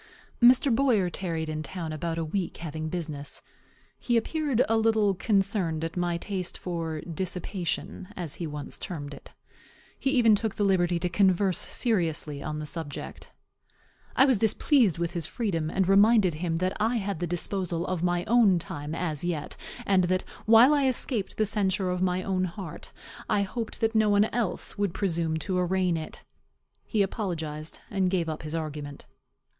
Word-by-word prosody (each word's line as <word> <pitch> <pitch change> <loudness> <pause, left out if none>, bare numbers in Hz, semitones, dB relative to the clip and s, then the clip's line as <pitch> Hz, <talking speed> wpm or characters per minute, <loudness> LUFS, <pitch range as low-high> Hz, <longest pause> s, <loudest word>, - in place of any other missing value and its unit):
Mr. 250 +2 +6
Boyer 225 -9 +2
tarried 165 -4 -3
in 155 0 -3
town 160 +2 -5
about 165 +1 -3
a 165 - -1
week, 175 +2 -3
having 155 -1 -5
business. 155 -5 -5 0.6
He 240 -1 +1
appeared 275 0 +1
a 225 - +2
little 220 -2 +3
concerned 190 -5 0
at 165 - -4
my 175 -1 0
taste 185 0 -4
for 165 -3 -4
dissipation, 180 +1 -4
as 170 -5 -4
he 165 - -2
once 150 -1 -5
termed 145 -6 -5
it. - - -13 0.7
He 270 - 0
even 240 -5 +5
took 210 0 0
the 205 - 0
liberty 180 -3 +2
to 170 - -1
converse 190 +1 +3
seriously 165 - -1
on 150 0 -4
the 155 - -4
subject. 150 -2 -6 0.9
I 265 - +6
was 260 -7 +3
displeased 220 - +3
with 170 0 -1
his 170 -4 -3
freedom, 165 -9 -2
and 185 +2 +1
reminded 200 -1 +5
him 165 +1 -2
that 185 +2 -1
I 225 +3 +2
had 200 -6 -2
the 175 - -1
disposal 175 0 -2
of 185 -3 -2
my 175 0 0
own 225 -5 +5
time 150 -1 -5
as 160 -4 -2
yet, 170 -4 -3 0.3
and 190 -2 +3
that, 185 +1 0 0.2
while 230 +6 +8
I 285 -2 +3
escaped 235 -5 0
the 215 - +3
censure 195 -3 0
of 180 0 -2
my 185 0 +1
own 185 -1 0
heart, 175 -2 -7 0.4
I 200 - +3
hoped 220 +3 -5
that 225 0 +2
no 220 -1 +4
one 205 +1 +5
else 215 -3 -2
would 200 -4 0
presume 165 -4 0
to 185 +3 -1
arraign 180 -1 +1
it. 160 -1 -6 0.6
He 215 -3 +2
apologized, 160 -7 -4
and 190 -2 +1
gave 180 -3 0
up 155 - -4
his 155 +1 -5
argument. 150 -3 -5
180 Hz, 170 wpm, -27 LUFS, 165-205 Hz, 0.9 s, while